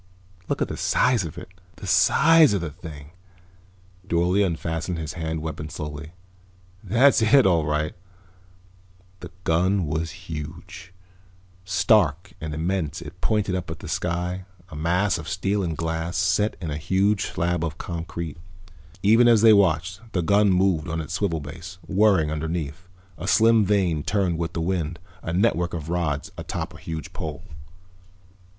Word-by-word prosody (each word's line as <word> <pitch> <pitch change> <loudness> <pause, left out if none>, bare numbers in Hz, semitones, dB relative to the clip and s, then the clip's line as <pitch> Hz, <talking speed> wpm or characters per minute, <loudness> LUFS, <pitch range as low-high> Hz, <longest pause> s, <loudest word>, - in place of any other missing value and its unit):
"Look - - 0
at - - -3
the - - -6
size 125 -5 +2
of 80 - -8
it. 90 - -9 0.3
The - - -10
size 160 -3 +5
of 100 - 0
the 80 -3 -4
thing." 75 -1 -11 1.0
Dorle 90 +3 +2
unfastened 80 -1 -2
his 80 -1 -5
hand 80 -2 -4
weapon 80 -1 -5
slowly. 75 +1 -7 0.7
"That's 130 +2 +4
it, 115 +4 +5
all 85 -5 +3
right." 75 0 -1 1.3
The - - -9
gun 90 +3 +2
was 80 +1 -4
huge. 85 +4 -8 0.7
Stark 90 -2 +2
and 80 0 -4
immense 85 -1 -2
it - - -12
pointed 105 -3 +1
up 90 -1 -3
at 80 - -5
the - - -10
sky, 90 +2 -2 0.2
a 75 - -10
mass 90 +5 +1
of 80 - -7
steel 95 +2 0
and 85 -4 -2
glass, 80 +1 -2
set 105 +3 +1
in 85 -4 -4
a 75 - -3
huge 95 +6 +1
slab 85 0 -1
of 80 -1 -3
concrete. 85 -2 -5 0.7
Even 115 +4 +6
as 115 -3 +5
they 110 -1 +8
watched 90 -1 +2
the 90 - 0
gun 100 +4 +4
moved 90 -3 +2
on 80 0 -2
its 75 - -5
swivel 85 -6 -1
base, 80 +5 -9
whirring 95 -6 +3
underneath. 80 +1 -4 0.3
A 90 - -5
slim 115 0 +5
vane 95 -6 +1
turned 90 -1 0
with 85 -1 -3
the 85 - -2
wind, 85 -2 -1 0.2
a - - -4
network 90 -2 +1
of 80 -1 -6
rods 85 -5 -2
atop - - -4
a - - -11
high 80 -1 -5
pole. 75 -2 -6
85 Hz, 155 wpm, -24 LUFS, 80-95 Hz, 1.3 s, they